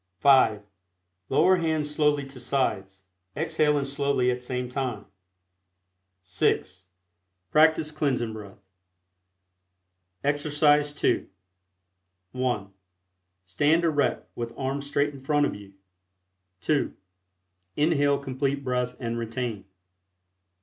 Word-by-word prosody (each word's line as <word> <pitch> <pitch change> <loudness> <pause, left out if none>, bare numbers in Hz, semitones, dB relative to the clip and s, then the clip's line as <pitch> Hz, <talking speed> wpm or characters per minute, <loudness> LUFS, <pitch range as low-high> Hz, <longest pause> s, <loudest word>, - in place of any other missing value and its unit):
(5) 115 -5 +4 0.7
Lower 185 0 +4
hands 155 -3 -1
slowly 150 -2 +2
to 135 -1 -11
sides, 95 -7 -2 0.3
exhaling 150 -2 +1
slowly 140 -2 +1
at 125 0 -4
same 125 0 -3
time. 125 -5 -3 1.2
(6) 95 +1 -1 0.7
Practice 155 0 +4
Cleansing 130 -7 -1
Breath. 105 -3 -10 1.7
EXERCISE 145 0 +2
II. - - +2 1.0
(1) 120 -6 -2 0.7
Stand 145 - +2
erect, 155 -4 +1
with 115 -1 -6
arms 140 +1 -3
straight 145 0 0
In 135 - -11
front 145 +1 +2
of - - -2
you. 100 -1 -12 0.9
(2) 150 -2 0 0.8
Inhale 145 -2 +3
Complete 140 +1 -2
Breath 125 -1 -1
and 115 -1 -3
retain. 115 -2 -4
135 Hz, 95 wpm, -26 LUFS, 120-145 Hz, 1.7 s, 5